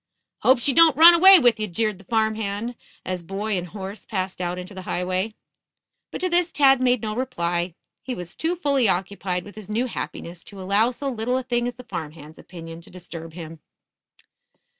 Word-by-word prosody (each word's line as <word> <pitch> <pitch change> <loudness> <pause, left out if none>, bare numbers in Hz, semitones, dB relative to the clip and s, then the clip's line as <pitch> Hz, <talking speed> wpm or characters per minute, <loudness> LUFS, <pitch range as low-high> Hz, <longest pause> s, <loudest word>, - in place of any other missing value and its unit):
"Hope 260 +1 +5
she 265 +3 +1
don't 325 -3 +6
run 335 +2 +10
away 380 +3 +9
with 240 -7 +3
ye," 215 - -1
jeered 210 +1 -2
the - - -15
farm 220 +1 +1
hand, 220 +2 -3 0.3
as 185 -1 -3
boy 195 +4 -3
and 180 -1 -3
horse 195 +2 -8
passed 190 -3 -4
out 175 0 -2
into 180 +3 -8
the 190 - -7
highway. 185 +4 -2 0.7
But - - -7
to 365 - 0
this 345 0 +1
Tad 270 -3 +4
made 250 -2 +2
no 215 -1 -3
reply. 175 -9 -2 0.3
He 255 - -5
was 175 -1 -7
too 330 +2 -1
fully 280 - +1
occupied 185 -1 -2
with 205 - -11
his 215 -2 -11
new 225 +4 0
happiness 175 -7 -6
to 205 -5 -10
allow 200 +5 +2
so 265 +3 -6
little 250 0 -1
a 260 - -3
thing 240 -1 -1
as 245 - -5
the 250 - -11
farm 160 -10 -6
hand's 155 0 -13
opinion 165 -2 -10
to - - -17
disturb 165 -2 -10
him. 165 -1 -9
215 Hz, 205 wpm, -23 LUFS, 180-250 Hz, 0.7 s, run